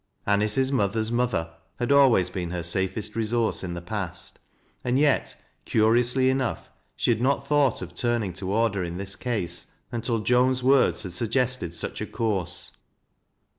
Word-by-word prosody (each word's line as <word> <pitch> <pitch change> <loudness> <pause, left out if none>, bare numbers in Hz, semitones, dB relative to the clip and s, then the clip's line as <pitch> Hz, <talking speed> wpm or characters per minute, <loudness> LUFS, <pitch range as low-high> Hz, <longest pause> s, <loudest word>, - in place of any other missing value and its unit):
An 100 0 +2
ice's 130 +6 +2
mother's 110 -2 +1
mother 115 -10 -1 0.2
had 120 +2 -1
always 125 -11 +5
been 90 -2 -4
her 85 -1 -4
safest 95 +4 -1
resource 115 -1 0
in 85 -2 -4
the 85 - -7
past, 95 -2 -5 0.4
and 125 +1 +1
yet, 145 -1 +1 0.2
curiously 120 +4 +3
enough, 130 -2 -2 0.3
she - - +1
had 110 - +1
aot 135 +2 +1
thought 140 -8 +2
of 90 -1 -9
turning 115 -2 -1
toward 100 +4 0
her 95 -2 -2
in 85 0 -5
this 100 0 -3
case 110 -6 -2 0.2
until 115 -1 -1
Joan'i 125 +2 +3
words 135 +1 +3
had 90 -3 -6
suggested 115 -3 -1
such - - -3
a - - -3
course. 100 -7 -3
115 Hz, 160 wpm, -25 LUFS, 95-125 Hz, 0.4 s, always